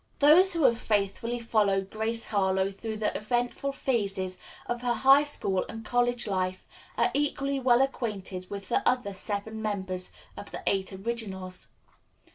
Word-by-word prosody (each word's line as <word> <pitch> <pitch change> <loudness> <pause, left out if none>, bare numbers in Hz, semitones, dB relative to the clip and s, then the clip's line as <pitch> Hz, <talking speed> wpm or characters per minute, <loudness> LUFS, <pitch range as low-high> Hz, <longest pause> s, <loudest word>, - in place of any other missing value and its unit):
Those 340 +7 +6
who 330 - +1
have 235 -3 +4
faithfully 210 +3 0
followed 205 -4 +1
Grace 225 +1 -2
Harlowe 190 -2 +1
through 220 +2 -5
the 215 -1 -1
eventful 245 +5 -1
phases 195 -9 -1 0.3
of 240 0 -3
her 245 -1 +1
high 270 +3 +6
school 195 -10 0
and 225 0 -7
college 245 +1 +1
life 185 -2 -2 0.3
are - - +3
equally 280 -1 0
well 250 0 +4
acquainted 200 -8 -3
with 200 -1 -6
the - - +2
other 250 -5 -1
seven 205 +3 -3
members 190 -4 -2 0.2
of - - -8
the - - -7
Eight 195 0 0
Originals. 190 -3 -4
220 Hz, 150 wpm, -28 LUFS, 195-245 Hz, 0.3 s, Those